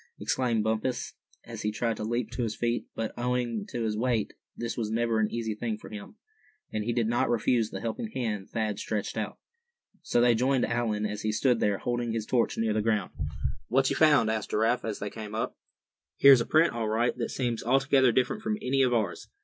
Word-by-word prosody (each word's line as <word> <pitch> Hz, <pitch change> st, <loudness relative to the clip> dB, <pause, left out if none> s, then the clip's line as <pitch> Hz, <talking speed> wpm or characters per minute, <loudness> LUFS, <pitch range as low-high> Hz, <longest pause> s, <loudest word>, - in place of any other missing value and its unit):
exclaimed 120 Hz, -4 st, 0 dB
Bumpus, 110 Hz, +3 st, -1 dB, 0.3 s
as -, -, -7 dB
he 105 Hz, -, 0 dB
tried 115 Hz, +2 st, -1 dB
to -, -, -4 dB
leap 120 Hz, 0 st, -2 dB
to 120 Hz, -, -3 dB
his 110 Hz, -2 st, -1 dB
feet; 120 Hz, 0 st, -1 dB
but, 115 Hz, -1 st, -3 dB
owing 120 Hz, -3 st, -1 dB
to 120 Hz, -, -3 dB
his 110 Hz, -1 st, -1 dB
weight, 115 Hz, -1 st, 0 dB, 0.2 s
this 120 Hz, 0 st, -3 dB
was 110 Hz, -3 st, -2 dB
never 115 Hz, 0 st, +1 dB
an 110 Hz, -, +2 dB
easy 115 Hz, -2 st, -2 dB
thing 110 Hz, 0 st, -3 dB
for -, -, -12 dB
him, 105 Hz, -, -9 dB, 0.6 s
and 110 Hz, -, -1 dB
he 120 Hz, -, -1 dB
did 120 Hz, -1 st, +1 dB
not 120 Hz, +1 st, +1 dB
refuse 115 Hz, -1 st, +2 dB
the 95 Hz, -, -6 dB
helping 115 Hz, -, -3 dB
hand 110 Hz, -, -3 dB
Thad 110 Hz, -2 st, -2 dB
stretched 105 Hz, -2 st, -3 dB
out. -, -, -3 dB, 0.6 s
So -, -, +1 dB
they 120 Hz, 0 st, +5 dB
joined 125 Hz, +2 st, +2 dB
Allan, 115 Hz, -3 st, -1 dB
as 105 Hz, 0 st, -3 dB
he 110 Hz, -, 0 dB
stood 120 Hz, +2 st, +2 dB
there, 100 Hz, -1 st, +1 dB
holding 120 Hz, 0 st, -2 dB
his 110 Hz, -2 st, -2 dB
torch 120 Hz, -1 st, +1 dB
near 110 Hz, -1 st, +1 dB
the 110 Hz, -, +1 dB
ground. 105 Hz, -2 st, 0 dB, 0.6 s
"What 135 Hz, +2 st, +2 dB
you -, -, 0 dB
found?" 145 Hz, -8 st, +5 dB
asked 110 Hz, -1 st, -2 dB
Giraffe, 115 Hz, +3 st, +1 dB
as 110 Hz, -2 st, -3 dB
they 100 Hz, 0 st, -5 dB
came 110 Hz, -1 st, -7 dB
up. 110 Hz, -, -2 dB, 0.6 s
"Here's 135 Hz, -3 st, +8 dB
a -, -, -3 dB
print, 160 Hz, +2 st, +4 dB
all 115 Hz, -2 st, -2 dB
right, 115 Hz, +3 st, +1 dB
that 115 Hz, -, -1 dB
seems 120 Hz, -3 st, -2 dB
altogether 135 Hz, +1 st, +4 dB
different 130 Hz, -, 0 dB
from 215 Hz, -1 st, -1 dB
any 135 Hz, -6 st, +1 dB
of 125 Hz, -2 st, +3 dB
ours. 105 Hz, -6 st, -2 dB
115 Hz, 215 wpm, -28 LUFS, 110-125 Hz, 0.6 s, Here's